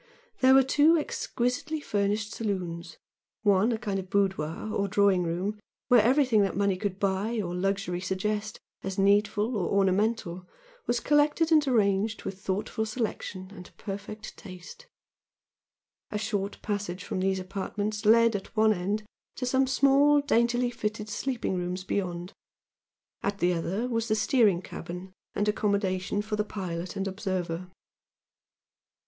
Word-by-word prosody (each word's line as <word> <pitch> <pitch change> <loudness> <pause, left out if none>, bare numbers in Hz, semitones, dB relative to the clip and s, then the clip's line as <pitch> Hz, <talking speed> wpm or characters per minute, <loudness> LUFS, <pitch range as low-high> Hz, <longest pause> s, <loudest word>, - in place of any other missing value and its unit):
There 260 0 +6
were 270 - +7
two 295 +5 +4
exquisitely 290 +1 -2
furnished 210 -3 -1
saloons 175 -6 -4 0.5
one 205 +2 +4
a 225 - 0
kind 200 -3 -2
of 185 -1 -7
boudoir 195 0 -1
or 200 - 0
drawing 200 -1 +3
room 180 +5 -2 0.3
where 245 -3 +7
everything 250 -2 +4
that 195 -2 0
money 200 -1 +2
could 190 0 -3
buy 200 +4 0
or 175 -4 -3
luxury 185 -1 -1
suggest 210 +3 -2 0.2
as 190 -1 -4
needful 205 +3 +2
or 185 -5 -1
ornamental 195 -2 +1 0.4
was 240 0 +1
collected 295 +4 +2
and 305 -2 +5
arranged 215 -3 +1
with 190 - -5
thoughtful 205 +3 -2
selection 215 -4 -4
and 180 -3 -12
perfect 205 +1 -7
taste. 205 - -11 1.2
A 210 - -2
short 205 -1 -2
passage 200 -3 -3
from - - -3
these 190 0 +1
apartments 205 +3 -3
led 230 +1 +5
at 200 +3 -6
one 220 0 +5
end 200 +3 -2 0.3
to 255 - -3
some 265 +1 +2
small, 280 +2 +5
daintily 240 -3 +2
fitted 215 -2 -4
sleeping 250 -3 -2
rooms 180 +1 -3
beyond, 180 -2 -3 0.9
at 200 0 -1
the 180 -2 +2
other 185 +8 -2
was 230 -2 -1
the 215 - +2
steering 210 -5 +3
cabin 180 +3 -8 0.2
and 205 - 0
accommodation 200 -2 0
for 210 0 -3
the 210 - +1
pilot 180 -4 -5
and 195 0 -2
observer. 185 -3 -3
205 Hz, 140 wpm, -28 LUFS, 190-225 Hz, 1.2 s, were